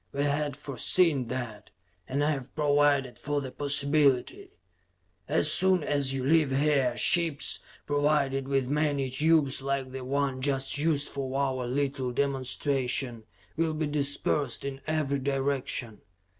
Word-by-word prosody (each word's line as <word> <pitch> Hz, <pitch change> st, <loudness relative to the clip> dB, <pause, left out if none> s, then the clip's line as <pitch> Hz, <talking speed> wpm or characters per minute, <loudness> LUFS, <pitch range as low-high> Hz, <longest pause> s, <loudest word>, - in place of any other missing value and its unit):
We 140 Hz, -, -1 dB
had 145 Hz, -1 st, -1 dB
foreseen 145 Hz, 0 st, +1 dB
that, 120 Hz, -4 st, -5 dB, 0.4 s
and 140 Hz, +2 st, 0 dB
have 140 Hz, -4 st, -2 dB
provided 145 Hz, -4 st, +2 dB
for 145 Hz, 0 st, -1 dB
the 135 Hz, -2 st, -6 dB
possibility. 145 Hz, -, +1 dB, 0.8 s
"As -, -, +2 dB
soon 185 Hz, -2 st, +2 dB
as 145 Hz, -2 st, 0 dB
you 135 Hz, -1 st, -2 dB
leave 155 Hz, 0 st, +3 dB
here, 135 Hz, -3 st, +1 dB
ships, 165 Hz, -2 st, +3 dB, 0.3 s
provided 145 Hz, -2 st, +1 dB
with 135 Hz, -2 st, 0 dB
many 145 Hz, -2 st, 0 dB
tubes 145 Hz, -1 st, +2 dB
like 135 Hz, -1 st, -2 dB
the 130 Hz, 0 st, -6 dB
one 135 Hz, 0 st, -1 dB
just 135 Hz, 0 st, -1 dB
used 150 Hz, -2 st, +1 dB
for 135 Hz, -1 st, -4 dB
our 130 Hz, -3 st, -1 dB
little 135 Hz, 0 st, -1 dB
demonstration, 130 Hz, -2 st, -1 dB, 0.3 s
will 160 Hz, -1 st, 0 dB
be 155 Hz, 0 st, -1 dB
dispersed 140 Hz, -3 st, -1 dB
in 135 Hz, -1 st, -5 dB
every 150 Hz, -3 st, 0 dB
direction. 135 Hz, -4 st, -2 dB
140 Hz, 130 wpm, -28 LUFS, 130-145 Hz, 0.8 s, leave